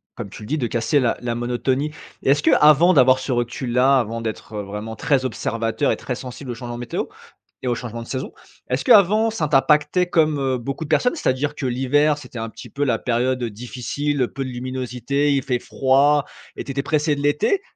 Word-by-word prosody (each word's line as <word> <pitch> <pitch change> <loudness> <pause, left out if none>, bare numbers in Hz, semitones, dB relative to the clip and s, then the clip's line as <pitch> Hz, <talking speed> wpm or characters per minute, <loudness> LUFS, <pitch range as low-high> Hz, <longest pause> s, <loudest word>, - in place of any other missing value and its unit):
comme 115 -5 -6
tu 105 - -11
le - - -7
dis 155 +5 -1
de 120 - 0
casser 120 +6 +1
la 120 -3 +1
la 120 -1 -3
monotonie. 125 +5 -1 0.3
Est-ce 145 +2 +2
qu'avant 155 +5 +6
d'avoir 130 -2 +5
ce 130 +1 -4
recul-là, 125 +2 +2
avant 115 0 -3
d'être, 110 0 -6
heu, 105 - -2
vraiment 105 +3 -6
très 130 +4 +1
observateur 115 +2 -1
et - - -1
très 130 - -4
sensible 125 +1 -7
aux 120 - -5
changements 120 0 -6
météo 120 -1 -3 0.6
et 125 - -2
aux 120 - +2
changements 115 -1 -6
de - - -14
saison, 130 0 -4 0.4
est-ce 130 +1 -1
qu'avant 215 +3 +5
ça 165 -8 -1
t'impactait 150 +5 +3
comme, 155 -4 +2
heu, 130 -1 0
beaucoup 140 +5 -4
de 145 - -11
personnes? 245 - +2
C'est-à-dire 145 - -1
que 135 - -4
l'hiver 140 +4 +2
c'était 125 -5 -9
un 115 0 -4
petit - - -12
peu 145 0 -2
la 120 -5 +1
période, 125 +1 0
heu, 115 - -1
difficile, 125 +4 -2
peu 135 -1 -3
de - - -5
luminosité, 130 +3 -1
il 135 - +1
fait 125 -2 -1
froid 140 +3 +3 0.3
et - - -5
tu - - -13
étais 140 +1 -2
pressé 150 0 +1
de 140 - -5
l'été 150 - +2
130 Hz, 215 wpm, -21 LUFS, 120-145 Hz, 0.6 s, qu'avant